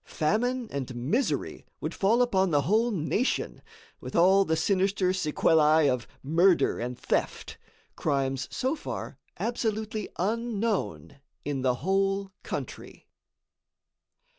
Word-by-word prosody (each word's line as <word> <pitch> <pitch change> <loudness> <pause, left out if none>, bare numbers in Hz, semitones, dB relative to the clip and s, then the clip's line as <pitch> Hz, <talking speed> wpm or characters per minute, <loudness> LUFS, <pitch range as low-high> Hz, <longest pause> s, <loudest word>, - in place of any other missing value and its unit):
Famine 240 +9 -1
and 130 -3 -4
misery 155 - -1 0.2
would - - -4
fall 225 +5 +3
upon 190 -6 +2
the 145 -3 +2
whole 220 - +2
nation, 205 - -1 0.4
with - - -8
all 190 +3 +5
the 160 -3 0
sinister 190 +2 +1
sequellæ 155 -3 +3
of 125 -1 -5 0.2
murder 170 +6 +3
and 120 +1 -4
theft, - - -2 0.4
crimes 135 -2 -1
so 265 +4 -1
far 295 - -6 0.2
absolutely 220 -2 -2
unknown 220 -7 -2 0.3
in 140 -2 -2
the 130 -1 +2
whole 195 0 +1
country. - - -7
190 Hz, 115 wpm, -27 LUFS, 150-220 Hz, 0.4 s, all